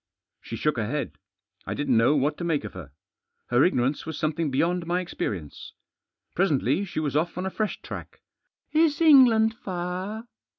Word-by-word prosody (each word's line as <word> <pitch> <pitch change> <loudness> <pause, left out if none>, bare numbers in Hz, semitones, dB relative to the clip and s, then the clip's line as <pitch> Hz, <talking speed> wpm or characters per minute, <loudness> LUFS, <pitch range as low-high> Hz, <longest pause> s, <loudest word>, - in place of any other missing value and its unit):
She - - -7
shook 150 -4 0
her 110 -2 -1
head. 120 - -4 0.5
I - - -2
didn't 145 -4 +1
know 115 +6 +4
what 145 +2 +1
to - - -4
make 160 -6 0
of 110 - -7
her. 85 -7 -10 0.6
Her 120 +3 +5
ignorance 135 -4 +1
was 160 -2 -6
something 155 0 -1
beyond 170 +5 0
my 175 +1 +1
experience. 100 - -5 0.6
Presently 165 0 +1
she 175 - -4
was 145 -3 -2
off 165 +3 0
on 180 - -2
a 190 - -2
fresh 215 +1 -2
tack. - - -8 0.5
"Is 310 -2 +3
England 250 -8 +6
far?" 185 +2 -5
165 Hz, 170 wpm, -26 LUFS, 135-190 Hz, 0.6 s, England